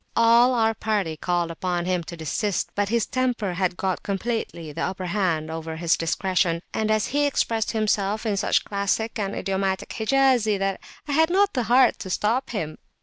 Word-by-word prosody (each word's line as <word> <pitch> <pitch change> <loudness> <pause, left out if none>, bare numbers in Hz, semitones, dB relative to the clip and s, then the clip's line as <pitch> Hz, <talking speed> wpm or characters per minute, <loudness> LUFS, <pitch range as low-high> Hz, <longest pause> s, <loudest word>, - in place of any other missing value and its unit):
All 235 +2 +5
our 225 -1 +2
party 205 -7 -1
called 175 +1 -1
upon 175 +1 -2
him 180 -1 0
to 170 - -8
desist, 185 +6 -2
but 205 -1 0
his 230 -2 +1
temper 245 -7 -1
had 180 0 -1
got 190 -1 -1
completely 200 -6 -3
the - - -5
upper 185 0 -3
hand 170 -5 -1
over 160 0 -5
his 165 0 +2
discretion, 170 0 0
and 220 -1 -1
he 265 +7 +1
expressed 225 -5 0
himself 215 -1 0
in 210 -2 +1
such 200 - +1
classic 210 +3 -1
and 195 -1 -2
idiomatic 190 -1 -1
Hijazi, 240 -3 +2
that 195 0 -2 0.3
I - - -3
had 320 +3 +3
not 400 +3 +3
the 250 -3 -1
heart 255 +2 +5
to 190 - -6
stop 230 +8 0
him. 160 -9 -4
200 Hz, 180 wpm, -24 LUFS, 180-230 Hz, 0.3 s, All